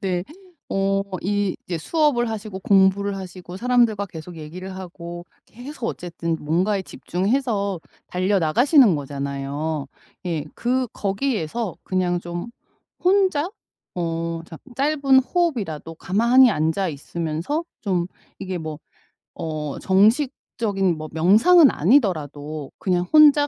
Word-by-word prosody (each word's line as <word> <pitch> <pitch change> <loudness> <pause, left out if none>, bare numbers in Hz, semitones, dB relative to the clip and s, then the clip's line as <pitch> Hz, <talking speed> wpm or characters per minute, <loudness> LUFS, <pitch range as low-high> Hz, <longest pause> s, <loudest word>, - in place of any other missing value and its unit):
네. 180 -2 -1 0.4
어 195 0 +1 0.2
이 205 0 0
이제 175 - -2
수업을 280 - +1
하시고 215 -3 -5
공부를 195 +1 +3
하시고 185 -1 -8
사람들과 235 -3 +2
계속 170 -1 -10
얘기를 180 +5 -8
하고 175 -2 -8 0.2
계속 245 +1 -7
어쨌든 170 -2 -3
뭔가에 185 +6 +1
집중해서 200 0 -1 0.3
달려 185 +2 +1
나가시는 235 - +5
거잖아요. 140 +1 -3 0.4
예. 160 -4 -2
그 255 +1 0
거기에서 205 - -2
그냥 180 -2 0
좀 175 +4 -5 0.5
혼자 370 -4 +3 0.5
어 165 -1 -2
잠 160 - -10 0.2
짧은 275 0 +3
호흡이라도 235 - -2
가만히 235 +9 +4
앉아 170 +1 0
있으면서 165 - -3 0.2
좀 180 -4 0 0.3
이게 190 -2 -4
뭐 155 -2 -6 0.6
어 155 -3 -4
정식적인 205 - +1
뭐 155 0 -6
명상은 225 - +6
아니더라도 155 - +1
그냥 180 -2 0
혼자 295 -1 +7
190 Hz, 260 characters per minute, -23 LUFS, 165-240 Hz, 0.6 s, 혼자